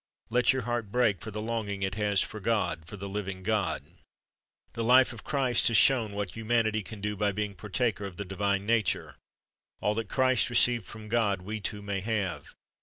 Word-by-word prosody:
Let 125 +1 +4
your 130 -2 -1
heart 120 -3 -3
break 110 -7 +2
for 110 - -6
the 105 0 -5
longing 110 -4 -3
it 95 - -1
has 105 -1 +1
for 110 - -7
God, 105 -6 -1
for 105 - -8
the 100 +1 -6
living 100 -2 -5
God. 105 -1 0 0.9
The 115 - -3
life 125 +1 +5
of 115 - -10
Christ 130 -5 +2
has 115 - +4
shown 115 -6 +4
what 100 -2 -3
humanity 115 -1 +1
can 105 0 -10
do 105 0 -2
by 105 0 +1
being 105 0 -3
partaker 105 +3 -2
of 95 -3 -8
the 100 - -4
divine 100 +1 -1
nature. 110 -4 0 0.6
All 105 +2 +1
that 110 -2 -4
Christ 130 -2 +3
received 120 -2 +3
from 110 0 -9
God 105 -4 +1
we 110 +3 -4
too 105 0 -5
may 100 -1 -2
have. 95 -7 -3
105 Hz, 195 wpm, -29 LUFS, 100-115 Hz, 0.9 s, life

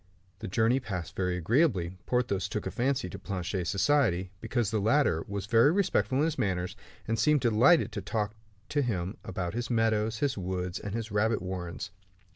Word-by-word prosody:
The - - -5
journey 115 +6 +2
passed 95 -9 -5
very 90 -1 0
agreeably. 95 - +1
Porthos 100 -7 0
took 105 - -3
a - - -2
fancy 130 -5 0
to 90 - -8
Planchet's 90 -2 -3
society, 100 -6 +2
because 120 -5 -1
the 110 - +1
latter 110 - +2
was 100 -1 -4
very 115 +7 +5
respectful 175 -8 +1
in 145 - +3
his 160 -1 -2
manners, 90 -2 -1 0.3
and 115 0 0
seemed 150 -2 +3
delighted 120 +5 +4
to 105 -1 -4
talk 105 0 -2 0.4
to 145 - +1
him 95 -8 -2
about 90 -1 -4
his 120 +1 -3
meadows, 110 -1 +1
his 135 -2 0
woods, 90 -1 -3
and 100 +1 -5
his 115 -1 -4
rabbit 110 +2 +2
warrens. 90 -2 -5
105 Hz, 180 wpm, -29 LUFS, 95-120 Hz, 0.4 s, very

